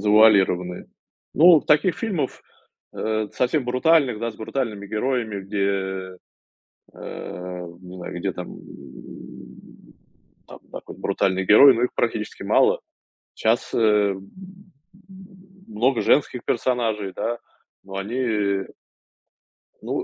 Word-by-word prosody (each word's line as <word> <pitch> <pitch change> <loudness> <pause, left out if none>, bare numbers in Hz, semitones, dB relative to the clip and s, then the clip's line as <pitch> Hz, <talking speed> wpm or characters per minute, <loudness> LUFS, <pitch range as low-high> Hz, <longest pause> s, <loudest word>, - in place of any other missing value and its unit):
завуалированные. 100 -4 +3 0.5
Ну, 165 -1 +7
таких 155 +4 +2
фильмов, 180 - -3 0.5
э, 110 -1 -1
совсем 125 +2 0
брутальных, 130 -1 +2
да, 115 +1 -2
с - - -17
брутальными 110 -3 -4
героями, 110 -2 -2
где, 95 -2 -3 0.8
э, 90 -1 -7
не 90 0 -11
знаю, 90 -1 -7
где - - -2
там - - -8 1.9
там - - -12
какой-нибудь - - -10
брутальный 95 0 0
герой, 135 +7 +8
но 115 - -1
их 125 - -1
практически 110 -2 -2
мало. - - +3 0.6
Щас, 110 +2 0
э, - - +1
м, 105 -3 +2 1.5
много 115 +4 +1
женских 130 -3 +2
персонажей, 115 -5 -1
да, 120 +4 -3 0.4
но 95 0 -9
они 105 -2 -1 1.2
Ну, - - -3
110 Hz, 105 wpm, -23 LUFS, 95-125 Hz, 1.9 s, герой